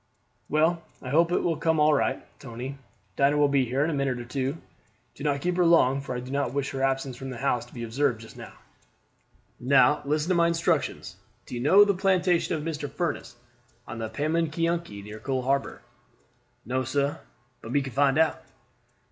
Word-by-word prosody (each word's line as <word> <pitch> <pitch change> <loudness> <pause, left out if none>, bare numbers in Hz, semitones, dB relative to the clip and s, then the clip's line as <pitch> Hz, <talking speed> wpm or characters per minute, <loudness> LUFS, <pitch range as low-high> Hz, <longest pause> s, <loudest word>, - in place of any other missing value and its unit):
"Well, 160 +3 +2 0.2
I 130 - -8
hope 170 +3 +3
it - - +2
will - - +1
all - - -6
come 160 0 +1
right, 150 -3 +2
Tony. 130 +2 -7 0.4
Dinah 140 +1 +3
will 145 0 +4
be 140 -2 +2
here 130 +4 0
in 155 - 0
a - - -2
minute 140 -3 -1
or 120 - -7
two. 135 +3 -2 0.6
Do 140 - -10
not 140 -2 0
keep 180 +2 -1
her 180 - +4
long, 140 -6 +4
for 130 -2 -5
I - - -2
do 125 +1 -8
not 140 -2 -1
wish 140 -1 -1
her 135 - -4
absence 135 -1 0
from 135 +1 -7
the 125 - -6
house 120 -2 0
to - - -19
be 120 - -5
observed 120 +1 0
just 115 - -13
now. - - -10 1.1
Now, 135 +3 +4
listen 150 +3 -1
to - - +4
my 170 -1 +4
instructions. 170 0 -1 0.3
Do - - -11
you 120 - -3
know 195 +10 +7
the 200 - +2
plantation 185 -3 +1
of 150 - -4
Mr. 150 -3 -4
Furniss, 145 -7 -3 0.5
on 110 +1 -7
the 110 -1 -3
Pamunkeyunky, 160 -3 -1
near 105 +1 -9
Coal 130 0 -2
harbor?" 140 +2 -1 0.8
"No, 130 +3 -1
sir; 140 +3 -1 0.4
but 115 - -8
me 140 +1 +2
can 130 -2 -7
find 140 +1 +3
out." 160 0 +2
140 Hz, 200 wpm, -26 LUFS, 130-160 Hz, 1.1 s, know